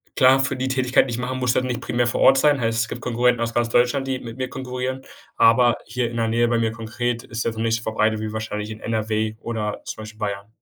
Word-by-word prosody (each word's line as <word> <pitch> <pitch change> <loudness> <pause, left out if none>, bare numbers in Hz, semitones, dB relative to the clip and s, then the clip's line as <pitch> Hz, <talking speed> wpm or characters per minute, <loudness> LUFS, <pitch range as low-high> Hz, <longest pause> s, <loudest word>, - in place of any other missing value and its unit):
klar, 130 0 +6
für 135 0 0
die 130 0 -2
Tätigkeit, 130 -1 +3
die - - -4
ich 115 - -3
mache, 125 +1 -3
musst 125 -1 0
du - - +4
halt 130 - -3
nicht 125 0 -3
primär 120 -1 0
vor 120 - -1
Ort - - +7
sein, 145 -1 +3
heißt, 115 0 0
es - - -5
gibt 120 - -7
Konkurrenten 125 0 +1
aus 115 0 -1
ganz 120 0 +1
Deutschland, 125 +3 +2
die 130 -1 -1
mit 115 -1 -9
mir 130 -1 -2
konkurrieren. 130 0 -4 0.3
Aber 120 +1 +5
hier 120 +1 -2
in 120 - -8
der 115 -1 0
Nähe 120 +1 +2
bei 120 0 +1
mir 115 -1 +1
konkret 115 +1 -3
ist 115 0 -4
das 115 -1 -2
noch - - -2
nicht 115 0 +1
verbreitet, 110 -1 0
wie 110 0 -3
wahrscheinlich 110 -1 -4
in 110 - -8
NRW 110 -1 -1
oder 110 -3 -3
zum 110 - -7
Beispiel 110 0 -11
Bayern. 100 -2 -3
115 Hz, 265 wpm, -22 LUFS, 110-125 Hz, 0.3 s, Ort